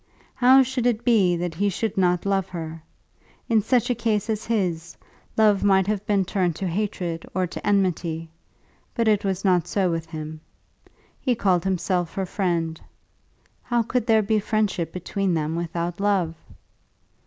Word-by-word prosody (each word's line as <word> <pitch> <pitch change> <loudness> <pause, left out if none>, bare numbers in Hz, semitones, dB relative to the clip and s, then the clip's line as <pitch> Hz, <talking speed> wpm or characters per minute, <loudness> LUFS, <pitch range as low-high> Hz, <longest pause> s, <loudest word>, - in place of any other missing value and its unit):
How 260 +1 +6
should 255 -1 -1
it 235 -1 0
be 200 -8 +4
that 175 0 -3
he 200 +5 0
should 215 +2 -2
not 180 -2 +2
love 195 -2 0
her? 165 -2 -6 0.7
In 225 -2 +3
such 245 +3 +1
a - - +4
case 225 -2 -1
as 215 -1 -3
his, 175 -7 -1 0.4
love 210 -2 +4
might 190 -2 +4
have 205 0 -1
been 200 -2 +2
turned 180 -3 0
to 190 - -3
hatred 175 -3 -2
or 185 -1 +1
to 175 - -8
enmity; 175 -5 0 0.7
but 230 -2 +1
it 210 -2 +3
was 195 0 -2
not 180 -3 +3
so 190 -3 +1
with 165 -1 -3
him. 155 -1 -7 0.8
He 250 -3 +1
called 185 -6 +2
himself 180 -2 -1
her 195 - -1
friend. 170 -4 -2 0.8
How 240 -1 0
could 235 0 -1
there 220 -2 +4
be 215 +1 +1
friendship 205 -5 -1
between 185 0 -2
them 155 0 -1
without 170 +1 -3
love? 195 -5 +1
190 Hz, 165 wpm, -24 LUFS, 170-215 Hz, 0.8 s, How